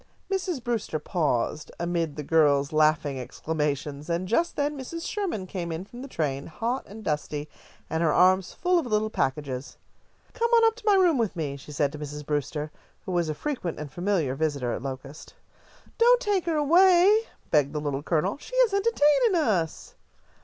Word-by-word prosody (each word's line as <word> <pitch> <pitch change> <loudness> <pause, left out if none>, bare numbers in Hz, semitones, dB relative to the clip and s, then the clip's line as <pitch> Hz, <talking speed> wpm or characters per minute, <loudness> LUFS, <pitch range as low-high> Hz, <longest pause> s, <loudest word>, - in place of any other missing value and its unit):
Mrs. 360 -8 -2
Brewster 230 -9 -2
paused 150 -3 -1
amid 170 -3 -1
the 150 - -5
girls' 145 -2 +3
laughing 155 -3 +2
exclamations, 150 +2 -3
and 170 +2 -1
just 330 - +1
then 290 +1 -1
Mrs. 330 +6 -6
Sherman 375 - -2
came 175 -2 -5
in 165 +3 -4
from 240 +4 -11
the 275 - -7
train, 140 - -2
hot 235 +10 -2
and 215 +2 -10
dusty, 150 -2 -2 0.4
and 160 - -2
her 160 -2 +3
arms 185 +3 +4
full 360 0 +1
of 315 - -4
little 215 -1 0
packages. 135 -3 -2 0.6
"Come 470 -1 0
on 460 -1 +6
up 450 0 +3
to - - -13
my 410 - +6
room 355 -8 +4
with 220 -5 0
me," 150 -4 -3
she 140 +2 -11
said 145 -1 0
to 150 - -8
Mrs. 150 0 -7
Brewster, 150 +1 -2 0.3
who - - -4
was 175 -3 0
a 155 - -2
frequent 210 - -3
and 150 -2 -7
familiar 175 -7 0
visitor 140 -4 -1
at - - -4
Locust. 135 +2 -8 0.6
"Don't 485 +1 +6
take 405 -7 0
her 330 - +1
away," 365 +7 +5 0.3
begged 145 -3 +3
the 150 - -3
Little 145 -2 -2
Colonel, 170 - 0
"she - - -9
is - - +4
entertaining 400 0 +3
us." 205 - 0
175 Hz, 180 wpm, -26 LUFS, -, 0.6 s, on